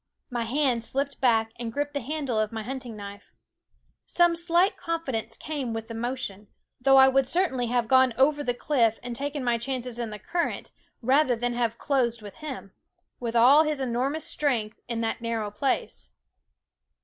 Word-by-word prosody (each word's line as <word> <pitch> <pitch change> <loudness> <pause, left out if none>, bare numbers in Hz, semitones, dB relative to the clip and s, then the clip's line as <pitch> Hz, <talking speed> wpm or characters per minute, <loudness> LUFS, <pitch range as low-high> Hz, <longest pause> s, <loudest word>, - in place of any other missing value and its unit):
My 240 -2 -1
hand 250 -1 +1
slipped 275 +4 -3
back 225 -3 +3
and 235 -1 -4
gripped 290 +4 -2
the 285 - -2
handle 275 -3 -2
of 215 -1 0
my 220 -1 -4
hunting 250 -2 -6
knife. 200 0 -10 0.7
Some 345 -1 +3
slight 345 +3 +2
confidence 270 - -3
came 280 -7 -4
with 225 0 -5
the - - -5
motion; 225 -4 -4 0.3
though 270 +2 +5
I 265 0 +9
would 265 -1 +3
certainly 270 -7 +1
have 240 -1 0
gone 260 +1 +5
over 290 +3 +3
the 245 -3 -1
cliff 235 -5 +1
and 245 -1 -5
taken 280 +1 -3
my 240 -1 +1
chances 250 -1 -4
in 235 -2 -2
the 210 - -6
current, 340 - -3 0.3
rather 260 +1 +4
than 240 +1 -1
have 235 -1 -1
closed 240 -6 0
with 205 - -9
him, 270 -10 -7 0.5
with 235 -1 -4
all 255 +6 +7
his 305 -2 -1
enormous 265 +4 -1
strength, 235 -8 -1
in 235 -1 -2
that 225 +1 -2
nar 230 -1 -2
row 205 -1 -4
place. 260 +6 -2
250 Hz, 180 wpm, -26 LUFS, 230-280 Hz, 0.7 s, I